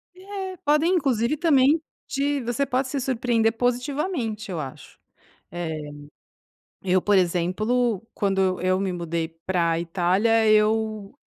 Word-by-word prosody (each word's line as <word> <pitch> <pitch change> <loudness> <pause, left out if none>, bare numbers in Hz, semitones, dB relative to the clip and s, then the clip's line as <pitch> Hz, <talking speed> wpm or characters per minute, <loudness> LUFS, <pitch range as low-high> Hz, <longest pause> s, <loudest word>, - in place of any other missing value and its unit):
É, 380 0 -7
podem, 300 +5 +3
inclusive, 270 -3 +1
também, 300 -1 +4 0.3
te 280 0 -1
você 240 +3 -1
pode 260 0 -1
se 280 - -2
surpreender 235 -3 +1
positivamente 245 - -2
eu 175 -4 -3
acho, 135 -3 -10 0.5
eh, 175 -1 -4 1.1
eu 185 0 +2
por 205 +2 +2
exemplo, 195 +6 +1
quando 195 -1 0
eu 185 -1 +1
eu 185 +1 +1
me 195 -2 -1
mudei 170 -2 -3 0.2
pra 170 -3 +1
Itália 190 +6 +2
eu, 215 -1 +1
225 Hz, 130 wpm, -24 LUFS, 185-270 Hz, 1.1 s, também